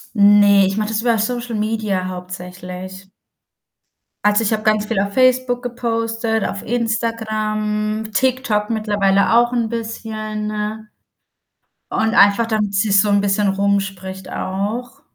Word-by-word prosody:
Ne, 205 -1 +6
ich 195 +2 -2
mache 215 0 -1
das 220 0 -1
über 235 -1 +2
Social 240 +1 -2
Media 210 -3 -1
hauptsächlich. 185 +1 -8 1.2
Also, 210 +2 +4
ich 215 - 0
habe 215 -1 -1
ganz 215 -1 +2
viel 215 -2 -1
auf 200 +1 -1
Facebook 255 0 +2
gepostet, 230 -2 -2
auf 200 - -4
Instagram, 215 -2 -2
TikTok 250 -3 0
mittlerweile 205 -2 +1
auch 240 +1 +4
'n 235 -2 0
bisschen 215 -1 -4 1.0
und 220 0 0
einfach, 200 +3 +5
damit 215 -3 -1
sich's 200 -1 +4
so 210 - 0
'n 200 0 +3
bisschen 200 +1 +1
rumspricht 195 -1 -2
auch. 230 +8 -4
215 Hz, 125 wpm, -19 LUFS, 200-225 Hz, 1.2 s, Ne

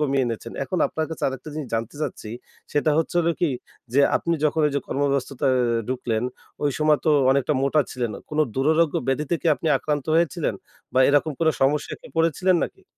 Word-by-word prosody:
কমিয়ে 140 -3 +1
এনেছেন। 115 0 -5
এখন 185 +2 -2
আপনার 160 0 -3
কাছে 160 - -7
আরেকটা 130 +3 -7
জিনিস 150 -5 -5
জানতে 115 +4 -3
চাচ্ছি 110 - -5 0.4
সেটা 150 +1 +2
হচ্ছে 165 - -1
হলো 170 0 +2
কি? 170 - +2 0.4
যে 140 - +4 0.2
আপনি 170 0 -1
যখন 155 +1 +2
এই 145 - -1
যে - - +1
কর্ম 140 - -2
ব্যস্ততা 135 0 -2
এ - - +2 0.3
ঢুকলেন 120 -3 -1 0.4
ওই 145 - +2
সময় 155 -1 +3
তো 155 - +3 0.2
অনেকটা 140 +2 +2
মোটা 145 +2 +3
ছিলেন। 120 -3 -2 0.2
কোন 150 - -3 0.2
দুরারোগ্য 155 +3 +2
ব্যাধিতে 150 +5 0
কি - - -2
আপনি - - -6
আক্রান্ত 145 -3 -2
হয়েছিলেন? 165 -3 +1 0.4
বা - - +3
এরকম 145 +2 +3
কোন 160 - +3
সমস্যায় 145 +2 +1
কি - - -12
পড়েছিলেন 170 +3 +2
নাকি? 385 - -11
145 Hz, 195 wpm, -23 LUFS, 135-160 Hz, 0.4 s, যে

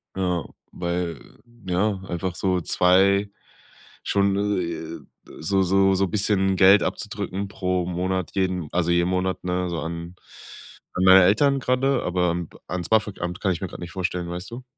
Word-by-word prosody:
Ja, 90 -3 -1 0.3
weil 85 -4 -4 0.3
ja, 95 +2 0
einfach 90 0 -3
so 90 0 0
2 95 +5 +3 0.7
schon, 100 0 +1 0.2
äh, 85 -1 -5 0.4
so 95 +5 +1
so 95 +1 +3
so 95 +1 +2
bisschen 95 0 +1
Geld 95 0 +6
abzudrücken 100 +2 -4
pro 90 -2 -1
Monat 90 0 -2
jeden 90 -4 -1
also 85 -1 +1
jeden 85 +1 +2
Monat, 95 0 -1
ne, 90 0 -1
so 85 - -2
an 85 +2 -6 0.8
an 90 - -1
meine 95 0 +8
Eltern 135 +9 +3
gerrade, 130 +1 +1
aber, 90 -1 +1
ähm, 85 -1 -4 0.2
ans 90 -1 -3
BAföG-Amt 100 -5 0
kann 95 - +1
ich 85 - -7
mir 95 - -2
gerade - - -10
nicht 85 - -8
vorstellen, 90 -2 -3
weißt 90 +5 -6
du? 125 +2 -8
90 Hz, 160 wpm, -24 LUFS, 85-95 Hz, 0.8 s, meine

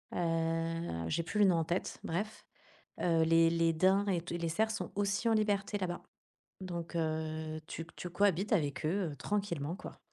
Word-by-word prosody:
heu, 165 - -1
j'ai 165 - 0
plus 210 +5 -2
le 205 - +7
nom 185 -3 +5
en 165 - +2
tête, 175 +3 -2
bref, 205 +6 -3 0.6
heu, 165 -2 +3
les 165 0 +5
les 165 0 +2
daims 190 +5 +3
et 180 -4 +1
tu 170 0 -4
les 170 -1 -1
cerfs 220 +6 +1
sont 225 - -4
aussi 200 +3 0
en 225 - +4
liberté 205 -1 +1
là-bas, 180 -3 -3 0.6
donc 175 -2 -5
heu, 155 -1 -2
tu 165 0 -6
tu 180 - -5
cohabites 200 +2 +2
avec 150 -6 +1
eux, 175 0 +1
heu, - - -9
tranquillement, 175 -3 -2
quoi. - - -9
170 Hz, 185 wpm, -33 LUFS, 165-200 Hz, 0.6 s, le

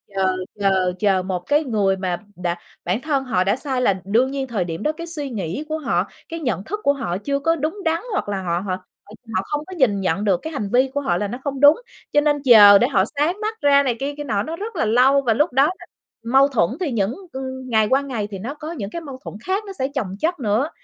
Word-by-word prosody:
chờ 190 -1 +1 0.2
chờ 190 -2 +2
chờ 195 -3 +2
một 185 -1 -2
cái 290 - +1
người 205 -7 +1
mà 185 -2 -2 0.2
đã 175 -1 -2 0.3
bản 185 +7 0
thân 285 -3 0
họ 225 -8 +1
đã 200 +3 +2
sai 265 -1 -2
là 195 -6 +1
đương 235 +7 +2
nhiên 275 -1 -3
thời 220 -7 -1
điểm 165 +3 -5
đó, 305 - +2
cái 335 +2 -8
suy 300 -4 -4
nghĩ 205 - -4
của 310 - -1
họ, 200 - 0 0.2
cái 330 - -5
nhận 245 -10 -2
thức 420 - -4
của 280 - +4
họ 180 -11 -3
chưa 280 +7 -2
có 325 +3 +2
đúng 320 +6 -3
đắn, 325 +1 +1
hoặc 390 - -2
là 195 -2 -2
họ 175 -2 -1
họ 185 -1 -2 0.3
h - - -21 0.3
họ 185 - +2
không 295 0 -2
có 375 - -9
nhìn 225 - +2
nhận 190 +2 0
được 195 -4 +2
cái 320 - -6
hành 210 -8 -3
vi 260 +2 +4
của 285 - -1
họ 175 -11 0
là 205 - -1
nó 240 - -5
không 275 -2 -3
đúng. 290 +3 +7 0.4
Cho 295 - +5
nên 295 0 +2
chờ 210 -6 +9
để 240 - +3
họ 225 -8 +2
sáng 330 +7 +1
mắt 440 +1 -3
ra 280 -1 +5
này 250 -4 0
kia 280 +2 -2
kia 295 - -4
nọ 210 -8 -1
nó 320 - -5
rất 420 +4 -6
là 320 - 0
lâu 255 +5 +4
và 240 -4 +2
lúc 295 +5 +1
đó 270 +2 +5
là 355 +5 -4 0.4
mâu 265 +4 +4
thuẫn 225 -12 +1
thì 345 -7 -1
những 220 0 0 0.2
ưm, 260 -1 -6
ngày 220 -2 +3
qua 270 +1 +3
ngày 245 -7 -3
thì 195 - -6
nó 240 +9 -5
có 305 +1 -7
những 210 -12 -5
cái 335 - -6
mâu 275 -5 -9
thuẫn - - -8
khác 385 +3 -1
nó 395 - -7
sẽ 265 - +1
chồng 195 -8 -2
chất 335 +4 0
nữa. 230 +5 +1
260 Hz, 270 wpm, -21 LUFS, 200-295 Hz, 0.4 s, chờ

